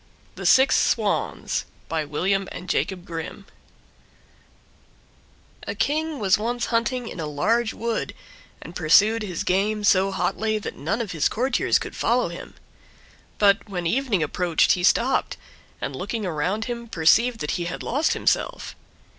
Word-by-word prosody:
THE - - -3
SIX 265 +1 +5
SWANS - - 0 0.2
By 160 -2 -2
William 190 +6 -1
and 180 - -8
Jacob 185 -2 -1
Grimm 170 +4 -7 2.2
A - - -3
king 310 +1 -1
was 195 -3 +2
once 240 +2 -2
hunting 235 +1 0
in 180 - -8
a 155 - -3
large 220 +11 0
wood, 230 0 -3 0.5
and 170 - -11
pursued 200 +7 +4
his 185 -5 -4
game 205 +3 0
so 195 -1 +4
hotly, 215 +2 -1
that 210 - -6
none 170 - -2
of 215 -5 -4
his 160 -3 +1
courtiers 255 +5 +1
could - - -7
follow - - +1
him. - - -9 0.8
But 205 +1 +3
when 180 -3 -4
evening 220 - +1
approached 170 +2 +2
he 180 - +2
stopped, 245 +7 +2 0.4
and - - -4
looking 225 -4 -4
around 180 +6 -1
him 235 -1 -5
perceived 225 +7 +3
that 150 - -2
he - - -2
had 175 - -5
lost 290 +6 +1
himself. - - -1
205 Hz, 145 wpm, -24 LUFS, 175-235 Hz, 2.2 s, SIX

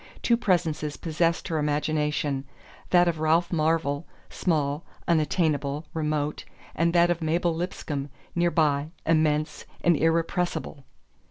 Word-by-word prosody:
Two 235 - +4
presences 160 -8 0
possessed 165 +1 0
her 160 -2 0
imagination: 150 -1 0 0.5
that 175 -1 +5
of 165 -2 0
Ralph 165 +3 +2
Marvell, 160 -2 0 0.2
small, 150 -3 0 0.2
unattainable, 155 -3 +1
remote, 150 -2 -1 0.3
and 170 +1 +2
that 175 0 +5
of 170 0 -2
Mabel 165 +2 +1
Lipscomb, 155 -4 -4 0.2
near 175 0 +2
by, 150 -3 +1 0.2
immense 155 -1 +1 0.2
and 170 -1 +5
irrepressible. 165 -2 0
160 Hz, 115 wpm, -26 LUFS, 150-170 Hz, 0.5 s, that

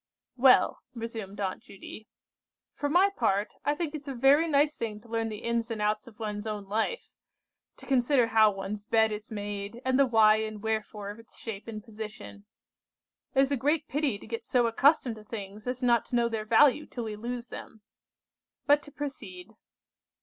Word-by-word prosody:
"Well," 255 0 +5 0.2
resumed 225 -4 -6
Aunt 190 -2 -2
Judy, 215 +2 -11 0.7
"for 290 - -2
my 370 +6 +4
part, 200 +2 0
I 290 - +1
think 320 -1 -3
it's 300 -2 -7
a 270 - -4
very 275 +6 +5
nice 295 0 +3
thing 215 -2 -4
to 235 - -18
learn 225 0 -1
the 215 +1 -7
ins 235 0 -1
and 225 -2 -4
outs 210 +1 0
of 225 -2 -15
one's 210 -1 -4
own 210 -2 -4
life; 220 - -2 0.7
to - - -13
consider 260 -1 +3
how 220 -1 +6
one's 200 +1 -5
bed 220 0 +3
is 210 0 -6
made, 205 +1 -5
and 260 +1 +2
the 275 - +5
why 220 -2 +5
and 215 -1 -4
wherefore 215 -2 -3
of 210 - -12
its 230 - -16
shape 220 -2 -7
and 215 -2 -6
position. 215 -2 -9 0.9
It 265 - +6
is 270 +1 +1
a - - +3
great 295 +4 +1
pity 280 -6 0
to - - -13
get 230 0 -5
so 245 -2 +2
accustomed 245 0 +3
to 215 - -12
things 210 0 -8
as 250 +1 -3
not 240 -1 +3
to - - -4
know 235 -1 +3
their 220 -2 -3
value 275 +6 +4
till 240 - -5
we 215 -1 -4
lose 240 +3 -5
them! 220 - -10 0.8
But 290 +1 +5
to 290 - -13
proceed. 220 -10 -7
225 Hz, 195 wpm, -29 LUFS, 210-260 Hz, 0.9 s, how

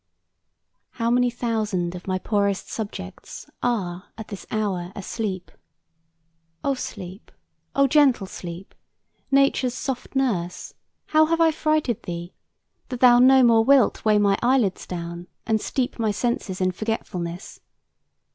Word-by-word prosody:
"How 230 -1 0
many 245 0 +3
thousand 215 -7 -2
of 180 +1 -9
my 185 -1 0
poorest 200 0 -1
subjects 200 - -7
Are 185 -6 -1
at 220 - -8
this 200 - -8
hour 190 -5 -2
asleep! 195 -2 -4 1.1
O 280 - +1
Sleep, 195 -6 -8 0.4
O 275 - +5
gentle 275 -6 +4
Sleep, 180 0 -8 0.6
Nature's 275 -2 +2
soft 260 0 -5
nurse, 195 -10 -1 0.4
how 310 0 +5
have 330 +1 +1
I 325 -1 +5
frighted 305 -7 0
thee, 175 0 -6 0.6
That 250 - -5
thou 245 -1 +7
no 260 +1 +7
more 230 -2 +5
wilt 270 -1 +4
weigh 215 -1 +4
my 200 -1 +3
eyelids 240 -6 +1
down 170 0 -6 0.2
And 220 -1 +1
steep 250 -2 -2
my 220 -1 +1
senses 210 -3 -2
in 185 0 +2
forgetfulness? 180 -4 -4
220 Hz, 130 wpm, -24 LUFS, 185-250 Hz, 1.1 s, thou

